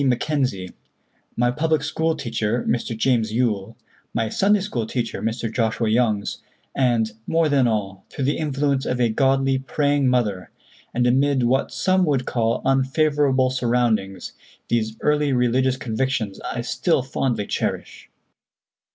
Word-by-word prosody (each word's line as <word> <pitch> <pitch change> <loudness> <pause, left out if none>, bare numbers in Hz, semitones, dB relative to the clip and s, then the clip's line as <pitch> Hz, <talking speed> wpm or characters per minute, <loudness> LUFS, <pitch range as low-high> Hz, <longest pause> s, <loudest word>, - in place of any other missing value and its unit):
Mackenzie; 130 -7 0 0.7
my 120 +1 +2
public 155 +2 0
school 160 +1 0
teacher, 115 -1 -2
Mr. 115 -1 -1
James 115 -2 +1
Yool; 110 -2 -1 0.4
my 115 -1 0
Sunday 200 - +2
school 120 - -3
teacher, 120 -2 -3
Mr. 115 0 -3
Joshua 115 -1 0
Youngs; 110 -3 0 0.3
and, 120 -4 +1 0.2
more 165 -1 +2
than 135 -3 +3
all, 100 -4 -2
through 135 - -3
the 145 - 0
influence 140 -2 0
of 125 - -1
a 120 -2 +3
godly, 135 +2 +2
praying 145 0 +1
mother, 110 -7 0 0.4
and 120 0 0
amid 135 +1 +2
what 130 +3 +1
some 185 0 +2
would 135 -5 0
call 115 -1 0
unfavorable 135 -1 +2
surroundings, 115 -7 0 0.4
these 110 -1 -1
early 150 -1 +2
religious 125 +1 +2
convictions 120 -3 -2
I 120 - -3
still 130 +4 0
fondly 130 -5 -1
cherish." - - -4
125 Hz, 135 wpm, -22 LUFS, 115-140 Hz, 0.7 s, than